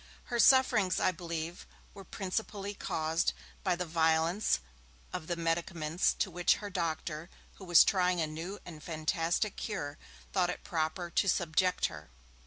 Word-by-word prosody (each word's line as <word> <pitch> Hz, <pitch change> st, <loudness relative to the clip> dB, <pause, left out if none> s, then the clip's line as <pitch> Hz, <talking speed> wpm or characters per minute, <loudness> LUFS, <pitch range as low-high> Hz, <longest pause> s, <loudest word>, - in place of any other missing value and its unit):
Her 240 Hz, -, +1 dB
sufferings, 230 Hz, -9 st, +5 dB
I -, -, +3 dB
believe, 170 Hz, -1 st, -5 dB, 0.3 s
were 195 Hz, -, -10 dB
principally 200 Hz, +1 st, -3 dB
caused 160 Hz, -3 st, 0 dB, 0.3 s
by 185 Hz, -3 st, +2 dB
the 180 Hz, +1 st, -3 dB
violence 160 Hz, -, +2 dB, 0.5 s
of 165 Hz, -3 st, -4 dB
the 175 Hz, -, -1 dB
medicaments 165 Hz, 0 st, 0 dB
to 190 Hz, -, 0 dB
which 175 Hz, 0 st, +3 dB
her 205 Hz, -1 st, -7 dB
doctor, 165 Hz, -2 st, -3 dB, 0.3 s
who 190 Hz, -, -10 dB
was 175 Hz, -2 st, +8 dB
trying 180 Hz, -2 st, +2 dB
a 160 Hz, -, +2 dB
new 165 Hz, +6 st, -6 dB
and 160 Hz, -3 st, -9 dB
fantastic 165 Hz, +5 st, -1 dB
'cure', 150 Hz, -9 st, -4 dB, 0.3 s
thought 180 Hz, -2 st, +2 dB
it 180 Hz, -, -5 dB
proper 170 Hz, +1 st, -2 dB
to 195 Hz, -, +2 dB
subject 180 Hz, +2 st, +2 dB
her. -, -, -5 dB
175 Hz, 150 wpm, -32 LUFS, 160-190 Hz, 0.5 s, was